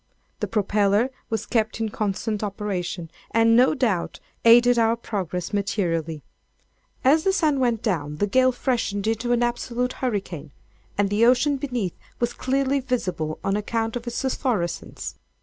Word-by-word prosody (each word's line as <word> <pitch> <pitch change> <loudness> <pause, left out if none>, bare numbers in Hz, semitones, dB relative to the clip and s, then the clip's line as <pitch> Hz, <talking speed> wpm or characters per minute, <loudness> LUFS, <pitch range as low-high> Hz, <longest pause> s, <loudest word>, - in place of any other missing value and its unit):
The - - -1
propeller 210 +2 +2 0.2
was 220 -2 -2
kept 220 -1 0
in 225 -1 -1
constant 210 0 -2
operation, 190 -5 -3 0.2
and, 230 0 +4
no 255 +5 +5
doubt, 220 - -1 0.2
aided 240 +1 +6
our 225 0 +3
progress 185 -6 -4
materially. 170 -7 -1 0.8
As 305 +5 +5
the 385 - +3
sun 315 -7 +2
went 240 -3 +1
down, 150 -9 -1
the 205 - +1
gale 255 +5 +4
freshened 230 -5 -1
into 225 +2 0
an 240 0 +3
absolute 240 +1 -1
hurricane, 195 - -3 0.4
and 200 -1 +1
the 210 +2 +3
ocean 275 +3 +3
beneath 245 - -2 0.3
was 240 0 0
clearly 275 +1 0
visible 185 - -2
on 195 - +1
account 225 +2 -1
of 240 0 -5
its 240 - -2
phosphorescence. 240 - -2
225 Hz, 150 wpm, -24 LUFS, 200-245 Hz, 0.8 s, aided